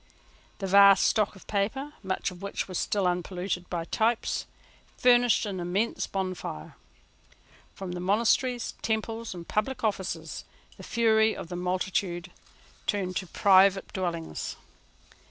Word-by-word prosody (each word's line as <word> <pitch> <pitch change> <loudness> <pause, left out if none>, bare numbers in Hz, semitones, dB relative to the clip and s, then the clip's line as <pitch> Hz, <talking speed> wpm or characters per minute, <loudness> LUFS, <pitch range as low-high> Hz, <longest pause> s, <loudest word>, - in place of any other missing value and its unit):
The 195 - -4
vast 200 0 +7
stock 215 -2 +2
of 190 - -15
paper, 245 +9 -2
much 190 -1 -2
of 180 0 -12
which 200 0 -3
was 185 -2 -3
still 200 -2 0
unpolluted 180 0 -2
by 170 -2 -3
types, 225 +5 0 0.5
furnished 245 -2 +4
an 195 -3 -4
immense 185 +6 -1
bonfire. 185 - -4 1.0
From 190 -2 -6
monasteries, 235 +5 +1
temples, 225 -1 -2
and 170 -1 -9
public 225 +5 -1
offices, 185 -6 -2 0.3
the - - -13
fury 220 -2 +3
of 170 - -7
the 180 - -5
multitude 180 0 -2 0.6
turned 190 -3 -1
to 185 - -4
private 195 +1 +4
dwellings. 170 - -3
195 Hz, 125 wpm, -28 LUFS, 180-220 Hz, 1.0 s, vast